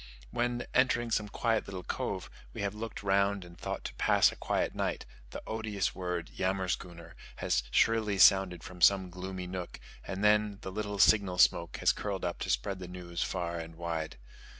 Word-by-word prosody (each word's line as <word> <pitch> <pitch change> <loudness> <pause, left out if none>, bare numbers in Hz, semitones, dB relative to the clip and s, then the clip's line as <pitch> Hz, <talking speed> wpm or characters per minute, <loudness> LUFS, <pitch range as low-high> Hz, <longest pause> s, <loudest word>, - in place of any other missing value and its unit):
When, 120 0 -1
entering 120 -2 +2
some 105 -1 0
quiet 115 +1 0
little 95 -2 -6
cove, - - -3 0.2
we - - -5
have 100 0 -1
looked 110 0 -6
round 100 -1 +2
and 85 0 -13
thought - - -5
to - - -5
pass - - +4
a - - -10
quiet - - -1
night, - - -2 0.2
the - - -8
odious 110 -3 -2
word 90 -2 -4
"yammerschooner" 90 -2 -2 0.2
has 65 - +1
shrilly 110 - +2
sounded 95 -3 +5
from 90 -1 -10
some 95 0 +5
gloomy 90 +1 -6
nook, 90 -1 -6 0.2
and 95 +2 -5
then 105 -1 +3
the 95 - -6
little 105 0 -3
signal 100 -2 +4
smoke 85 -2 +3
has - - +4
curled 100 -3 -3
up 85 - -3
to - - -4
spread 80 +11 0
the 90 - -7
news 90 -1 -6
far 85 -2 -2
and 80 0 -8
wide. 80 -3 -4
95 Hz, 180 wpm, -31 LUFS, 90-105 Hz, 0.2 s, sounded